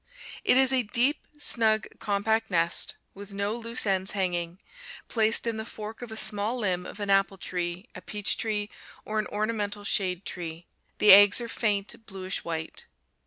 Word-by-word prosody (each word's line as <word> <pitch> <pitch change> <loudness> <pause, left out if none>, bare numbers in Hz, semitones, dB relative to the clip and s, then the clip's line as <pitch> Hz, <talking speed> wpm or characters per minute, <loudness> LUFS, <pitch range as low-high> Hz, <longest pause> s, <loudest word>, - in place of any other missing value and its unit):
It - - +4
is 265 0 +4
a 260 - +3
deep, 245 +6 +1
snug, 220 -6 +3
compact 220 +2 -1
nest, 170 -2 +2 0.2
with 200 +1 -11
no 200 +2 -2
loose 235 0 -1
ends 190 -1 0
hanging, 175 -2 -2 0.5
placed 220 0 +1
in 230 -1 -2
the 220 - -4
fork 220 0 -9
of 240 -2 -8
a 220 - -7
small 210 +3 +1
limb 185 -6 -1
of - - -10
an 200 -1 -2
apple 195 0 +2
tree, 180 +2 -4
a - - -10
peach 205 -1 0
tree, 210 -2 -2 0.3
or 215 0 -2
an 215 - -2
ornamental 210 -1 -3
shade 190 -2 0
tree. 170 -1 -6 0.3
The 210 - +6
eggs 205 +3 +9
are 235 - -4
faint 210 -2 -2
bluish 190 -2 -5
white. 160 -1 -6
205 Hz, 170 wpm, -27 LUFS, 190-220 Hz, 0.5 s, eggs